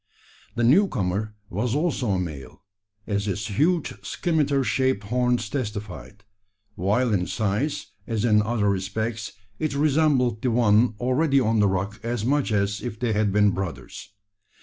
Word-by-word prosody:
The 120 - 0
new 165 - +5
comer 105 - -2 0.2
was 110 +6 -1
also 150 -6 0
a 95 - 0
male, 75 -6 -7 0.4
as 100 0 -2
its 100 +2 -2
huge 170 +1 +2
scimitar 145 -5 0
shaped 130 -5 0
horns 125 +1 0
testified; 105 -5 -6 0.5
while 105 +6 +1
in 90 -3 0
size, 110 +8 -2 0.2
as 115 -1 -1
in 105 -2 +4
other 105 -1 0
respects, 110 +4 -2 0.3
it 155 -3 -1
resembled 140 -6 +2
the 130 - +1
one 115 -1 +3
already 135 +3 +2
on 115 -3 +1
the 105 - +4
rock 100 +3 -2
as 115 -1 -2
much 140 -1 +1
as 100 -1 0
if 115 -3 -6
they 120 -3 0
had 105 -1 +1
been 105 0 +4
brothers. 95 -2 -6
110 Hz, 150 wpm, -24 LUFS, 100-130 Hz, 0.5 s, new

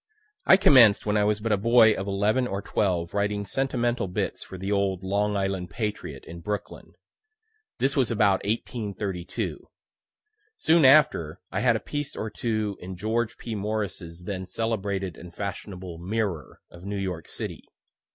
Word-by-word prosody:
I 190 - +9
commenced 125 - +6
when 105 0 +1
I 105 -1 +3
was 105 0 +1
but 110 +1 -2
a 105 - +4
boy 115 +1 +6
of 95 - -4
eleven 105 +6 +1
or 100 -4 -3
twelve 85 -4 0
writing 100 0 0
sentimental 120 -4 0
bits 90 - -3
for 95 - -9
the 95 +2 -4
old 100 -2 0
"Long 100 +2 0
Island 95 -2 -2
Patriot," 105 -3 -4
in 85 +1 -9
Brooklyn; 105 +4 -5 0.8
this 135 +1 +1
was 130 -5 +2
about 105 -4 +2
1832. 100 -4 -3 0.9
Soon 165 - +4
after, 130 - +5
I 95 - -1
had 120 +1 +3
a - - 0
piece 145 +3 -5
or 110 - -4
two 110 -4 -2
in 90 0 -7
George 110 +4 -1
P. 115 - -6
Morris's 100 -5 -4
then 95 -1 -4
celebrated 100 -5 -2
and 85 0 -12
fashionable 95 -3 -6
"Mirror," 95 - -3
of 85 0 -13
New 100 +1 -4
York 90 -4 -4
city. - - -6
100 Hz, 160 wpm, -26 LUFS, 95-110 Hz, 0.9 s, I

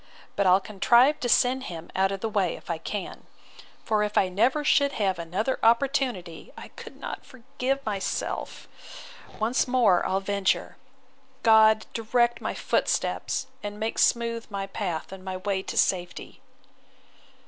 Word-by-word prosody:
But 200 - +2
I'll 185 +1 +6
contrive 240 +9 +3
to 245 - -2
send 255 +3 +2
him 170 -1 -8
out 190 +1 +2
of 195 -1 -5
the 225 - -1
way, 200 -5 0
if - - -8
I 165 - -3
can:—For 210 +3 -6
if 210 0 -1
I 190 - +3
never 240 +11 +1
should 280 -1 +3
have 195 -4 0
such 170 - -4
another 215 +10 -1
opportunity, 235 - 0
I - - -10
could - - -12
not - - -6
forgive 270 +1 -4
myself. 205 -3 -4 0.7
Once 230 +5 +1
more 235 -8 +3
I'll 190 - 0
venture. 200 0 -1 0.7
God 220 -1 +5
direct 240 +1 +1
my - - -3
footsteps, 265 - -1 0.2
and 205 0 -6
make 220 +1 -2
smooth 230 -1 +1
my 200 -2 -4
path 185 -5 -4
and 190 -1 -10
my 185 -1 -4
way 190 0 -2
to - - -6
safety! 175 -2 -1
215 Hz, 150 wpm, -26 LUFS, 190-240 Hz, 0.7 s, I'll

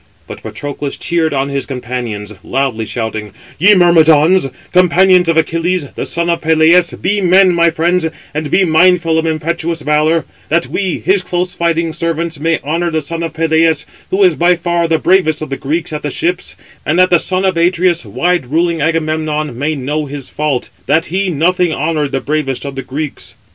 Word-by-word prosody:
But - - -10
Patroclus 140 +6 -5
cheered 165 -2 0
on 135 0 -1
his 140 -1 -3
companions, 120 -5 -5
loudly 130 -4 -2
shouting: 110 -3 -4 0.3
"Ye 205 +6 +6
Myrmidons, 165 -2 +4 0.2
companions 180 0 +4
of 165 - +2
Achilles, 165 -1 0
the - - -4
son 170 0 -1
of 170 -1 0
Peleus, 160 +2 +4
be 205 +2 0
men, 185 0 +4
my 170 0 +3
friends, 170 +1 0 0.3
and 150 0 -3
be 190 +5 +3
mindful 165 0 +3
of 160 - -1
impetuous 165 +1 -2
valour; 155 +2 +1 0.2
that 170 +2 +1
we, 190 -3 -2
his 195 0 +1
close 180 0 -2
fighting 165 -1 -1
servants, 165 -1 -3
may 165 +1 +1
honour 165 +4 -1
the 160 -2 -2
son 165 +3 -5
of 165 -1 -4
Peleus, 160 -1 +1 0.2
who 195 +1 +2
is 180 -3 +5
by 175 +3 +3
far 170 0 -1
the 165 -1 +2
bravest 170 -3 +2
of 155 - -8
the - - -1
Greeks 155 +3 -3
at 150 - -4
the 150 - -3
ships; 175 +5 -2 0.3
and 155 - 0
that 185 0 +4
the 175 - +5
son 185 +2 -1
of 190 -2 +1
Atreus, 175 0 +1
wide 175 -6 -1
ruling 165 +3 0
Agamemnon, 155 -2 -1
may 145 +5 -2
know 145 +3 -3
his 140 -1 -6
fault, 150 -4 -2 0.2
that 155 +4 +2
he 195 0 0
nothing 175 +2 +1
honoured 150 -1 -1
the 135 - -2
bravest 145 -3 -2
of 140 - -5
the 135 - -5
Greeks." 145 +2 -6
165 Hz, 185 wpm, -14 LUFS, 150-175 Hz, 0.3 s, Ye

